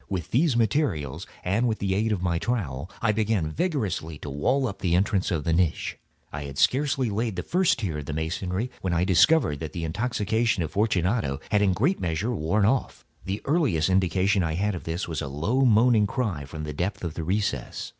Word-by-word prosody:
With 90 -5 -4
these 135 0 +3
materials 95 - 0 0.2
and 100 +7 +1
with 110 -2 0
the 95 -1 -1
aid 110 +3 +1
of 95 -4 -1
my 85 -2 +1
trowel, 85 - -2
I 110 - +4
began 105 -7 0
vigorously 95 - -2
to 75 - -7
wall 130 - +1
up 100 - -4
the 90 -3 +1
entrance 95 +1 +1
of 80 -4 -1
the 80 - +1
niche. 85 -1 0 0.4
I 70 0 -4
had 70 -1 -8
scarcely 130 - +2
laid 110 0 -1
the 90 - -3
first 180 0 +2
tier 90 -10 -3
of 70 - -8
my 75 - -3
masonry 90 +8 -2
when 90 -2 -1
I 85 +1 +2
discovered 95 - +4
that 80 -2 -6
the 85 - -4
intoxication 110 +2 0
of 80 - -5
Fortunato 95 - 0
had 105 - +3
in 100 - +4
a - - +2
great 150 - +1
measure 90 +8 -1
worn 100 +2 +1
off. 125 +5 0 0.2
The 95 +2 -3
earliest 135 - +2
indication 95 +1 +2
I 80 -2 -1
had 100 +4 0
of 90 - -6
this 85 +3 -3
was 80 -4 -3
a - - -3
low 100 - +1
moaning 115 -2 +5
cry 100 - -2
from 75 +3 -7
the 75 -1 -4
depth 90 +7 -3
of 85 -3 -3
the 80 - -4
recess. 90 - -2
95 Hz, 215 wpm, -26 LUFS, 80-115 Hz, 0.4 s, moaning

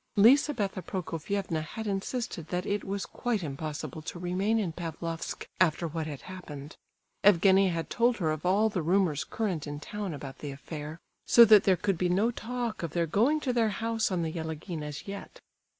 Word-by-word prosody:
Lizabetha 225 -3 +4
Prokofievna 180 -1 -3
had 220 +8 -6
insisted 200 -3 -3
that 180 +1 -2
it 205 0 -1
was 195 0 -3
quite 230 -6 -2
impossible 155 +1 -5
to 160 - -6
remain 185 +5 0
in 200 -6 0
Pavlofsk 165 0 -5
after 170 -1 +3
what 160 0 -3
had 145 -3 -6
happened. 155 -6 -9 0.5
Evgenie 195 0 +6
had 165 -2 -3
told 235 0 +3
her 160 -5 0
of 155 0 -4
all 195 +5 +3
the 200 -5 -1
rumours 170 -3 +2
current 185 -9 -2
in 145 0 -5
town 205 +4 -5
about 135 -2 -8
the 145 - -5
affair; 150 +3 -7 0.3
so 235 - +9
that 215 -2 +7
there 190 -2 +4
could 195 -2 0
be 180 - +2
no 205 +7 +2
talk 240 -1 -4
of 170 -3 -4
their 170 -1 +1
going 235 - +2
to 255 -4 0
their 230 -2 +3
house 225 +1 -1
on 180 -3 0
the 160 - -2
Yelagin 160 0 -5
as 150 +2 -6
yet. 200 0 -8
185 Hz, 185 wpm, -29 LUFS, 160-210 Hz, 0.5 s, so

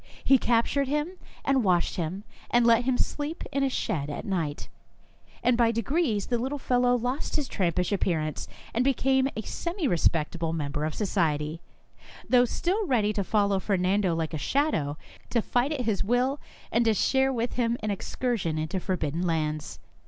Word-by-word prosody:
He 270 -1 +5
captured 240 +4 +2
him 300 +6 -2 0.3
and 270 -3 +3
washed 180 -3 +2
him, 180 +4 -3 0.3
and 240 0 +4
let 235 +1 +5
him 255 -1 +2
sleep 295 +2 -2
in 275 - 0
a 275 - +2
shed 165 - -2
at 145 - -5
night, 165 -8 -2 0.8
and 245 0 +4
by 235 -1 +3
degrees 230 - 0
the 240 -2 -1
little 265 +4 -2
fellow 245 -2 +2
lost 250 +4 -2
his 295 -3 0
trampish 180 -3 0
appearance, 160 -6 -1 0.3
and 240 - +2
became 265 0 +2
a 220 - -3
semi 340 - -3
re 175 - +2
spectable 165 +1 0
member 150 -1 -2
of 155 - -3
society, 160 -6 0 0.7
though 250 -1 +5
still 380 - -1
ready 215 -6 +2
to 200 - -1
follow 200 -1 +2
Fernando 190 -1 +1
like 165 0 -2
a 155 - -2
shadow, 155 - 0 0.3
to 240 - +2
fight 245 +5 0
at 295 -4 -1
his 215 -6 0
will, 250 +6 +1 0.3
and 235 +2 +3
to 220 -1 +3
share 265 +6 +2
with 240 -1 -2
him 235 -1 0
an 215 - 0
excursion 200 -5 -2
into 155 +4 -2
forbidden 170 -4 -2
lands. 155 -3 -1
225 Hz, 175 wpm, -27 LUFS, 170-260 Hz, 0.8 s, He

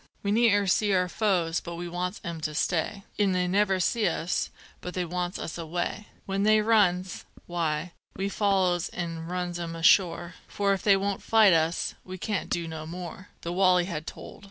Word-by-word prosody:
"We 200 - 0
ne'er 210 -2 +4
see 200 +2 +2
our 180 -1 +2
foes 180 -4 +1
but 170 -1 -7
we 175 +1 -5
wants 180 +3 -3
'em 170 -4 -5
to 155 -1 -3
stay, 180 +5 -1 0.2
An' 200 -2 +3
they 180 0 +1
never 195 0 +2
see 215 +3 +1
us 175 +1 -1 0.3
but 180 - -6
they 180 -1 -1
wants 180 +1 -3
us 165 - -5
away; 175 +5 -3 0.2
When 195 0 -1
they 215 +1 +5
runs, 190 -5 +2 0.2
why, 165 -1 -2 0.2
we 195 +1 -2
follows 190 -4 +1
an' 165 -2 -5
runs 180 0 -3
'em 165 -1 -4
ashore, 170 0 +3
For 200 -1 +1
if 195 - -2
they 200 -2 +5
won't 200 0 -2
fight 220 -4 +5
us, 165 +1 +1
we 185 0 -8
can't 200 +1 -3
do 170 -1 -1
no 160 -1 -6
more!" 180 +2 -8
The 170 - -3
"wolley" 180 -1 +4
had 160 -4 -5
told. - - -9
180 Hz, 190 wpm, -27 LUFS, 170-195 Hz, 0.3 s, they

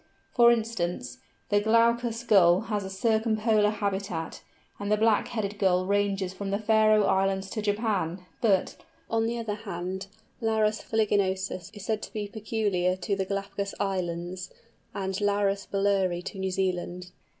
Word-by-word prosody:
For 235 -1 +6
instance, 175 - -2 0.3
the 205 0 +3
Glaucous 230 +1 +2
Gull 185 -5 +5
has 210 -2 -2
a 190 - -5
circumpolar 220 +1 +2
habitat, 200 -5 -3 0.4
and 205 0 -3
the 210 - +4
Black 220 -1 +3
headed 205 -3 -3
Gull 185 -2 +3
ranges 200 -1 0
from 195 +1 -5
the 200 - 0
Faröe 215 -1 +4
Islands 195 0 +1
to 215 - -2
Japan; 200 -5 -1 0.2
but, 195 -5 +2 0.4
on 225 0 +2
the 235 +1 -2
other 225 -3 -3
hand, 190 -2 -5 0.3
Larus 220 -1 +1
fuliginosus 195 -4 0
is 205 - -8
said 220 -1 -1
to - - -8
be 210 -1 -3
peculiar 205 -4 0
to 185 +2 -2
the 195 -1 -1
Galapagos 200 0 -3
Islands 180 -2 -3 0.4
and 190 0 -3
Larus 200 -1 +1
bulleri 195 -3 +1
to 195 - -7
New 190 0 -1
Zealand. 180 -1 -2
200 Hz, 150 wpm, -27 LUFS, 190-215 Hz, 0.4 s, For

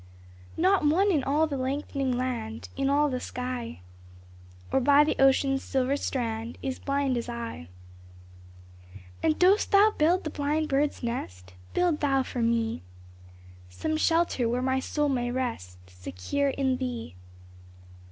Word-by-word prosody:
Not 375 +2 +3
one 365 +7 +3
in 295 -7 +1
all 295 +4 +2
the 290 -3 -3
lengthening 265 -1 -2
land, 230 -3 -4
In 275 0 0
all 290 +1 +3
the 255 -3 -2
sky, 250 - -5 0.9
Or - - +3
by 285 +3 +5
the 300 - 0
ocean's 270 0 +3
silver 265 0 0
strand, 230 -4 -3
Is 265 -1 -3
blind 275 -2 0
as 235 +1 -4
I! 235 - -6 1.5
And 315 -1 +2
dost 380 +3 +4
Thou 410 +1 +6
build 340 +5 +2
the 310 - -4
blind 300 +2 -1
bird's 280 0 0
nest? 90 - -5 0.2
Build 350 -4 +2
Thou 270 -2 +2
for 250 - -4
me 230 0 0 0.9
Some 315 - -3
shelter 325 -7 +1
where 245 +2 -1
my 260 0 +1
soul 295 +2 -1
may 245 -3 0
rest 240 - -4
Secure 90 - -3
in 265 -1 0
Thee. 250 - -5
265 Hz, 140 wpm, -27 LUFS, 240-295 Hz, 1.5 s, Thou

